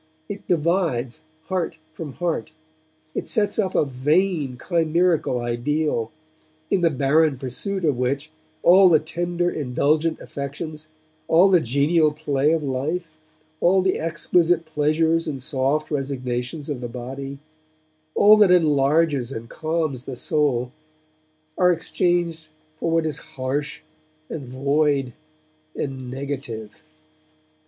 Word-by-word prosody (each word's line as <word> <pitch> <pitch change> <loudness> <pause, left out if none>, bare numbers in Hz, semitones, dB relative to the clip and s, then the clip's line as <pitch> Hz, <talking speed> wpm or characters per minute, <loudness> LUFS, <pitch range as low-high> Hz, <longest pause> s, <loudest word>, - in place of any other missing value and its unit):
It 205 0 -7
divides 165 -8 0 0.2
heart 175 -1 -2 0.2
from 155 -3 -7
heart. 170 -1 -2 0.6
It - - -4
sets 210 0 +1
up 190 -3 0
a - - +3
vain, 145 +1 0
chimerical 165 -2 +1
ideal, 120 +1 -1 0.6
in 190 - +2
the 170 - +4
barren 145 +1 +2
pursuit 170 +9 -4
of 140 -5 +1
which 140 +4 -1 0.3
all 185 +2 +7
the 160 - +6
tender, 175 +3 -2
indulgent 150 +4 0
affections, 150 +2 -6 0.4
all 175 +4 +5
the 185 -2 +5
genial 150 +4 +2
play 150 -1 0
of 165 -2 +1
life, 145 +6 -2 0.5
all 185 +2 +4
the 185 - +1
exquisite 165 +1 +1
pleasures 160 +2 +1
and 140 -3 -3
soft 140 +3 -1
resignations 135 0 -3
of 145 -5 -4
the 120 - -3
body, 135 +3 -6 0.8
all 210 +1 +7
that 210 -3 +6
enlarges 150 -5 +3
and 115 -2 -7
calms 155 -5 -2
the 130 - -5
soul 125 -3 0 0.9
are 180 -1 +5
exchanged 170 -1 0 0.3
for 165 - -1
what 165 0 +2
is 155 -1 -2
harsh 145 -2 -4 0.5
and 140 -5 -5
void 140 0 +1 0.6
and 130 -3 -4
negative. 130 -5 -6
150 Hz, 120 wpm, -23 LUFS, 135-165 Hz, 0.9 s, all